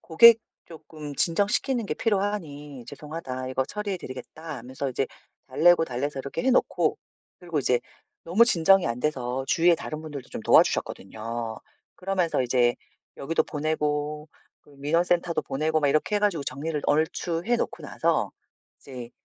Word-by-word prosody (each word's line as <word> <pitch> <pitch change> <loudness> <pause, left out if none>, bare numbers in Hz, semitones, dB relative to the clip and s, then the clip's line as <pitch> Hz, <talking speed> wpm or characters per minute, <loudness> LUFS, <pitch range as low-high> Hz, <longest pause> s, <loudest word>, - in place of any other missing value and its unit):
고객 230 +8 +7 0.3
쪼끔 155 -2 -9
진정시키는 205 +7 +1
게 150 - -2
필요하니 160 - -2
"죄송하다 130 -5 -6
이거 130 0 0
처리해 205 +3 -4
드리겠다." 150 +1 -8
하면서 130 +3 -5
이제 130 +1 -1 0.4
달래고 165 +5 +5
달래서 135 +1 -3
이렇게 140 - -4
해 265 - +4
놓고 255 - +2 0.4
그리고 170 -4 -3
이제 125 -2 +2 0.4
너무 195 +8 +5
진정이 195 -2 +4
안 120 +1 -2
돼서 130 -3 -1
주위에 175 0 +5
다른 155 -1 -6
분들도 145 -5 -8
좀 - - -6
도와주셨거든요. 110 +4 +1 0.4
그러면서 180 -5 0
이제 120 -1 +2 0.4
여기도 160 +4 0
보내고 150 0 -2 0.3
그 - - -23
민원센터도 170 +3 +1
보내고 155 +3 0
막 145 - +2
이렇게 155 +8 +1
해 - - +2
가지고 190 -9 +1
정리를 150 +4 -3
얼추해 165 +7 +1
놓고 - - -3
나서 - - 0 0.5
이제 125 -3 -9
155 Hz, 355 characters per minute, -26 LUFS, 135-175 Hz, 0.5 s, 고객